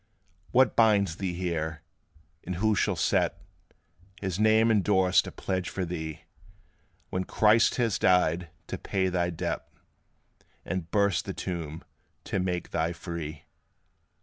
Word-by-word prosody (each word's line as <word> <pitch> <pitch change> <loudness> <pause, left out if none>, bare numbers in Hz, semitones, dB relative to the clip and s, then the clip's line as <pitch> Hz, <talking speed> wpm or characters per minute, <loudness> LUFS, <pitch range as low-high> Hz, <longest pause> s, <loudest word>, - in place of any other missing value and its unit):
What 130 -2 +4
binds 100 -6 +3
thee 95 -3 -3
here? 80 -3 -3 0.6
or 90 - -2
who 110 +5 +2
shall - - +1
set - - +1 0.8
His 95 -2 -3
name 110 +1 +5
endorsed 95 -3 +3
a - - -6
pledge 95 -1 -3
for 95 - -3
thee, 80 -3 -5 0.9
When 95 - -1
Christ 110 +4 +4
has 115 -5 0
died 90 -2 +3 0.2
to - - -5
pay 95 -1 0
thy 90 -1 0
debt, 85 - -4 1.0
And 90 -3 -3
burst 100 -1 +2
the - - -5
tomb 80 -3 -5 0.4
to - - -2
make 90 -1 -2
thee 85 +1 0
free? 80 -4 -6
90 Hz, 130 wpm, -28 LUFS, 85-100 Hz, 1.0 s, name